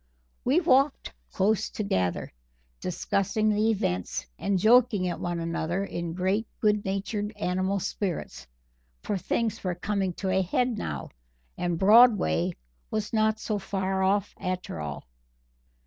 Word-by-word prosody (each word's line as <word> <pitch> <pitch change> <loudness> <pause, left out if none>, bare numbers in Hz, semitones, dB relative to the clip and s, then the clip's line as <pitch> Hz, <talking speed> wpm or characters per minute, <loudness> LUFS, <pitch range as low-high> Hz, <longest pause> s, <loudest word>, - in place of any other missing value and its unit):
We 275 +7 +3
walked 275 - +2 0.2
close 210 +2 +1
together, 95 - -1 0.5
discussing 200 +4 0
the 215 +1 +2
events 90 - -1
and 200 -1 +1
joking 220 -2 +4
at 175 - -3
one 175 -1 -2
another 170 +3 -2
in 170 -3 -4
great 190 +5 0
good 210 -1 +2
natured 205 +2 -2
animal 190 0 0
spirits, 185 -1 -4 0.6
for 205 - -1
things 225 +4 -1
were 180 -2 -1
coming 195 0 -1
to 190 +2 -3
a 190 0 +3
head 245 +6 0
now 75 - -4 0.5
and 175 -1 -1
Broadway 205 - +5 0.4
was 215 0 -3
not 220 0 +2
so 215 -2 -2
far 190 0 -2
off 195 +1 +1
after 185 - -3
all. 75 -4 -6
195 Hz, 130 wpm, -27 LUFS, 180-215 Hz, 0.6 s, Broadway